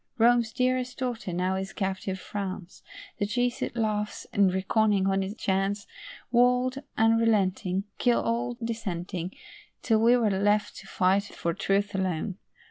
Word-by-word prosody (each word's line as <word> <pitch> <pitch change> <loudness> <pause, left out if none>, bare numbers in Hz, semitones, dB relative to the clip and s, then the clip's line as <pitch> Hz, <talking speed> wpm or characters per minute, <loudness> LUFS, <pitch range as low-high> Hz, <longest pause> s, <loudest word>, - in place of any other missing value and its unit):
Rome's 235 -1 +4
dearest 255 +1 0
daughter 245 -7 -3
now 180 +2 0
is 190 +2 -4
captive 190 -1 -2
France, 190 -2 -6 0.4
The 205 - 0
Jesuit 245 +2 -1
laughs, 210 -2 -1
and 200 -2 +4
reckoning 195 +1 +2
on 195 0 +2
his 195 +2 -4
chance, 195 0 -1 0.5
Would, 250 +3 +3
unrelenting, 210 -5 +2 0.2
Kill 245 -1 +3
all 240 +1 -1
dissenting, 185 -5 -4 0.5
Till 220 -3 +3
we 235 +2 +5
were 225 -4 +2
left 205 +2 +1
to 195 - -11
fight 190 +2 +2
for 170 -4 -3
truth 200 +4 0
alone. 190 0 -2
205 Hz, 135 wpm, -27 LUFS, 190-230 Hz, 0.5 s, we